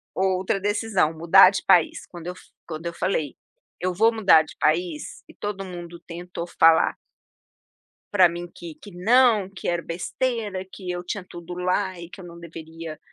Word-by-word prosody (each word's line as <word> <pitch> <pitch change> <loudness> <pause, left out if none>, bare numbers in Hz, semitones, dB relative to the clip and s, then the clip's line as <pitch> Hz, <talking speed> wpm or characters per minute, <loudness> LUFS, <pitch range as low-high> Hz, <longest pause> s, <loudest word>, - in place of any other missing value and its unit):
outra 190 0 0
decisão, 205 -5 0
mudar 170 +4 +7
de 195 - -3
país, 175 -3 +3
quando 175 -1 -10
eu 180 - -3
f - - -16 0.2
quando 160 0 -7
eu 170 - -4
falei: 155 -6 -2 0.4
"Eu 185 0 -1
vou 225 +5 +3
mudar 190 -8 +5
de 155 - -14
país." 160 0 -1
e - - -14
todo 200 -1 -5
mundo 175 -2 -9
tentou 175 0 -7
falar 165 -1 +4 1.2
pra 185 -3 +6
mim 175 +1 -6
que 170 -3 -9
que 205 - -13
não, 220 +1 +3
que 195 - -7
era 175 -1 0
besteira, 205 +3 -3
que 185 -3 -7
eu 175 0 -3
tinha 185 +1 -5
tudo 175 0 -9
lá 185 +1 -1
e 170 - -9
que - - -11
eu - - -10
não 170 -1 -11
deveria 165 -1 -9
180 Hz, 180 wpm, -24 LUFS, 170-195 Hz, 1.2 s, mudar